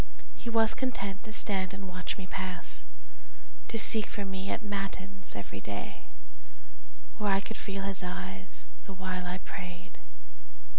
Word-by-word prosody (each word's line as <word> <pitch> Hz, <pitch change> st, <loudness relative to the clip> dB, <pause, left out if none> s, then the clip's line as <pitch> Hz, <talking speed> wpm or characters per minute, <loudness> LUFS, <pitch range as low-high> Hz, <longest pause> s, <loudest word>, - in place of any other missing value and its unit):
He 235 Hz, -, -4 dB
was 225 Hz, -1 st, +7 dB
content 205 Hz, -7 st, 0 dB
to 220 Hz, -, -4 dB
stand 190 Hz, -3 st, +2 dB
and 195 Hz, 0 st, -5 dB
watch 180 Hz, 0 st, -1 dB
me 190 Hz, -, -4 dB
pass, 185 Hz, -1 st, -3 dB, 0.8 s
To 230 Hz, -, 0 dB
seek 220 Hz, -1 st, +7 dB
for 205 Hz, -, -1 dB
me 190 Hz, 0 st, -2 dB
at -, -, 0 dB
matins 195 Hz, -2 st, -2 dB
every 100 Hz, -1 st, -4 dB
day, 100 Hz, 0 st, -4 dB, 1.1 s
Where 210 Hz, -1 st, +3 dB
I 195 Hz, -, +7 dB
could 225 Hz, +2 st, -4 dB
feel 195 Hz, -1 st, -2 dB
his 195 Hz, -1 st, +2 dB
eyes 95 Hz, -, -4 dB
the 195 Hz, -, -5 dB
while 185 Hz, -1 st, -1 dB
I 180 Hz, +1 st, 0 dB
prayed. 180 Hz, -1 st, -6 dB
195 Hz, 150 wpm, -33 LUFS, 180-200 Hz, 1.1 s, was